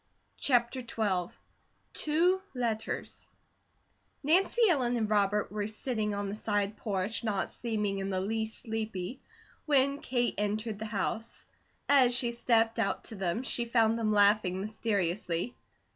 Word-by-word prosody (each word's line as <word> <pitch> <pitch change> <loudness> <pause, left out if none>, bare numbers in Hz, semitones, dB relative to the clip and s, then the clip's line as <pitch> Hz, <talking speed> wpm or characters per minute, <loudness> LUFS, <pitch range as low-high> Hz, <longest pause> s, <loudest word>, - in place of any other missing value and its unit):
CHAPTER 245 -1 +2
XII 205 -7 -1 0.6
TWO 345 +5 +2
LETTERS 230 -3 -2 0.9
NANCY 370 - +3
ELLEN 250 -7 +2
and 220 -2 0
Robert 210 -1 +1
were 205 0 -2
sitting 215 -1 -2
on 200 0 -2
the 200 - -4
side 205 -1 -1
porch, 200 +1 -2
not 205 -4 -1
seeming 210 -4 -2
in 195 0 -3
the 190 -1 -1
least 220 +3 -3
sleepy, 220 0 -4 0.5
when 280 -1 +3
Kate 245 -5 0
entered 210 +1 -2
the 220 - -4
house. 220 +2 -3 0.4
As 260 -4 +5
she 240 -2 +2
stepped 230 -1 +2
out 210 -3 0
to 225 - -6
them, 190 +4 -1
she 240 -2 0
found 230 -1 +2
them 215 -2 +1
laughing 205 -2 +3
mysteriously. 200 -1 -1
220 Hz, 135 wpm, -30 LUFS, 205-240 Hz, 0.9 s, As